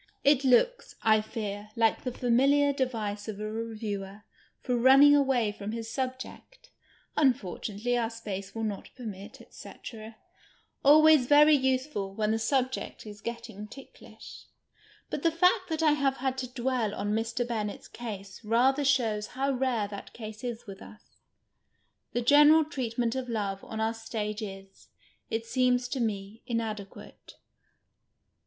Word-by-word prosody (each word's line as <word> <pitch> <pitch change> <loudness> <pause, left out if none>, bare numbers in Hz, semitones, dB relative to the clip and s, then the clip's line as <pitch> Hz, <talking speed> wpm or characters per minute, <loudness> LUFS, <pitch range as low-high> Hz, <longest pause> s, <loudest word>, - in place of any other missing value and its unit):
It 280 -1 +4
looks, 470 - +2
I 215 -1 +4
fear, 210 -1 -6
like 225 -1 +2
the 255 - -3
fami 245 +2 +2
liar 285 0 +3
device 220 -6 -3
of 210 -2 -6
a 215 0 -4
reviewer 215 -3 -5 0.4
for 250 - -1
running 270 +4 +7
away 265 -6 +2
from 205 +1 -6
his 225 -1 -5
subject 260 - -6 0.2
— - - -31
" - - -42
imfortunately, 240 - 0
our 225 - -1
space 200 -4 -7
will 225 - -3
not 205 -3 -4
permit, 205 -5 -9
&c. - - -11 0.4
' 220 - -32
— - - -39
always 305 -2 +6
very 295 +2 +7
usefid 260 -7 -1
when 215 0 0
the 225 - 0
subject 255 +2 -1
is 205 -1 -10
getting 230 -3 -7
ticklish. 275 - -13 0.7
IJiit - - -3
the 330 - +3
fact 360 +3 +2
that 320 0 -1
I 310 - +5
have 275 -2 +1
had 260 0 -1
to 255 - -3
dwell 245 -4 -1
on 205 - -2
Mr. 230 +2 -1
Bennett's 215 -4 -4
case 200 -3 -8
rather 255 +6 +2
shows 230 -6 +1
how 275 +1 +1
rare 250 -5 0
that 200 -1 -9
case 215 0 -9
is 240 -2 -5
with 195 -3 -10
us. 210 - -13 1.1
The 240 - 0
general 295 +5 +6
treatment 240 -6 -2
of 260 -1 -4
love 200 -4 -3
on 220 - -6
our 220 +1 0
ktagc 220 -1 -4
is, 195 -2 -9 0.4
it 225 0 -2
seems 250 0 +1
to 270 - -3
me, 210 -1 -3
inadeipiate. 215 -4 -6
230 Hz, 155 wpm, -28 LUFS, 215-265 Hz, 1.1 s, running